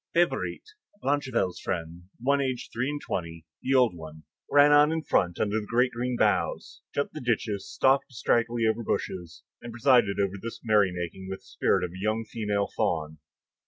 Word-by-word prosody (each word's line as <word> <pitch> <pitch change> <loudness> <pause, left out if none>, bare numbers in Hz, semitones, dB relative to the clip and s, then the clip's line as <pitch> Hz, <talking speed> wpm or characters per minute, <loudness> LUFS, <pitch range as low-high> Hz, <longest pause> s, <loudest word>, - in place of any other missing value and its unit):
Favourite, - - +1 0.4
Blachevelle's 130 -10 0
friend, 85 -1 -4
the - - -16
one 140 +2 +3
aged 130 -2 -3
three 125 +4 -1
and 145 0 -3
twenty, 85 - -5 0.2
the 135 +1 +1
old 125 -8 +4
one, 80 -1 -10 0.3
ran 145 +1 +6
on 145 +1 +6
in 160 -1 -2
front 90 - +1
under 105 +1 +1
the 105 - -8
great 125 +2 +2
green 125 +1 -2
boughs, - - 0
jumped 140 - -2
the 155 - -6
ditches, 110 -4 -1
stalked 135 +1 +3
distractedly 115 -1 +1
over 110 +1 +1
bushes, 90 -5 -4 0.2
and 120 - -8
presided 120 -4 +3
over 100 0 0
this 115 0 -6
merry 105 -4 +3
making 90 +2 -6
with 95 - -6
the - - -26
spirit - - +1
of 90 - -3
a 95 +1 -9
young 110 +2 0
female 105 -3 -1
faun. 80 -1 -1
110 Hz, 185 wpm, -27 LUFS, 95-125 Hz, 0.4 s, ran